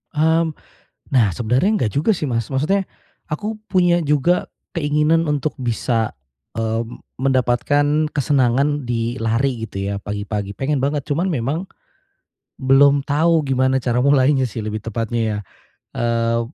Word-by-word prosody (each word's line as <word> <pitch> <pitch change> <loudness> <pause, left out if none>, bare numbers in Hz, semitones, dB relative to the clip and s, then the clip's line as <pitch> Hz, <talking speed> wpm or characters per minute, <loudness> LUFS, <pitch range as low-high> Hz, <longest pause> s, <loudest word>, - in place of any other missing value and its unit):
Mmm, 160 +1 +2 0.6
nah 125 -5 +4
sebenarnya 125 - +1
enggak 115 - 0
juga 150 - +1
sih 165 - -5
Mas 115 -2 -1
maksudnya, 180 +9 0 0.4
aku 210 +8 -4
punya 175 -2 +3
juga 150 +4 +2 0.2
keinginan 155 0 +1
untuk 150 0 -1
bisa, 115 -2 -1 0.4
eee, 115 +1 -1 0.4
mendapatkan 135 +4 +2
kesenangan 140 -1 +1
di 120 +1 -2
lari 115 +1 0
gitu 100 -1 -4
ya - - -2
pagi-pagi 100 0 -4
pengen 140 +1 -1
banget 140 +1 -1
cuman 165 +6 0
memang. 145 -2 -1 1.0
Belum 140 +1 +4
tahu 160 +2 +2
gimana 130 -1 +1
cara 125 -1 0
mulainya 135 -1 +3
sih 110 -1 -6
lebih 110 0 -3
tepatnya 115 +1 -3
ya, 105 -1 -2 0.6
eee, 115 0 +1
135 Hz, 130 wpm, -20 LUFS, 115-150 Hz, 1.0 s, nah